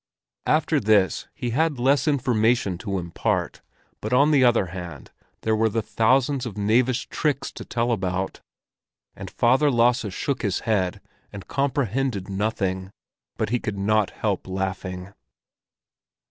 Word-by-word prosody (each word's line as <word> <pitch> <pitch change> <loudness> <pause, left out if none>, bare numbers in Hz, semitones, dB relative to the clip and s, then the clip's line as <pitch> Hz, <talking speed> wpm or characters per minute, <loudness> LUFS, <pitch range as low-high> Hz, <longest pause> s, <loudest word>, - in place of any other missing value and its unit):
After 155 0 +2
this 100 - +2
he 120 - -3
had 155 +3 +1
less 135 +5 +2
information 120 - +1
to 100 -2 -3
impart, 85 -2 -2 0.4
but - - -4
on 140 +4 +4
the 140 -3 +5
other 120 -5 +4
hand 85 -7 -8 0.3
there 110 0 +1
were 110 +1 +2
the 110 +1 -1
thousands 130 +4 +2
of 105 - -8
knavish 120 +5 +1
tricks 145 -3 -1
to - - -8
tell 120 0 -1
about. 95 -3 -2 0.7
And - - -8
father 130 +5 +3
Lasse 120 -4 +2
shook 135 +8 -2
his 100 -5 -1
head 95 -5 0 0.3
and 100 -3 -9
comprehended 130 -6 -1
nothing; 95 -2 -2 0.5
but - - -1
he 125 +2 +1
could 105 -3 -4
not 105 +1 +2
help 100 -4 -2
laughing. 95 0 -4
110 Hz, 140 wpm, -24 LUFS, 95-130 Hz, 0.7 s, the